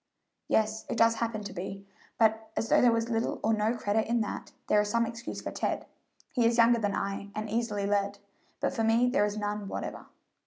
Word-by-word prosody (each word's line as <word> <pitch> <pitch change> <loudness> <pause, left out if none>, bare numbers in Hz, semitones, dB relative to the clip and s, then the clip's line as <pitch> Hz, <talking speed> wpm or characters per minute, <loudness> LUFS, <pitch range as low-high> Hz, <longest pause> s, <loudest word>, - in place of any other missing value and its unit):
"Yes, 220 0 +1
it - - -2
does 230 0 +4
happen 225 -2 -1
to 200 - -6
be 195 +2 -6 0.3
but, 220 0 +2
as 225 - -1
though - - +5
there 245 - +6
was 230 +1 0
little 225 0 0
or 225 - +3
no 215 +2 +1
credit 215 0 0
in 235 +1 +2
that, 210 - -4
there 210 - +4
is 210 - -2
some 230 +2 +2
excuse 235 +1 -6
for - - -4
Ted - - -2 0.5
he 245 - +2
is 230 +1 +3
younger 235 0 +6
than 205 -2 0
I 200 0 -3
and 215 0 -3
easily 210 -2 -1
led; 200 0 0 0.4
but - - 0
for 225 -4 -1
me 230 +3 +4
there 245 -5 +3
is 210 0 -3
none 205 -1 -3
whatever." - - -5
220 Hz, 220 wpm, -29 LUFS, 205-230 Hz, 0.5 s, there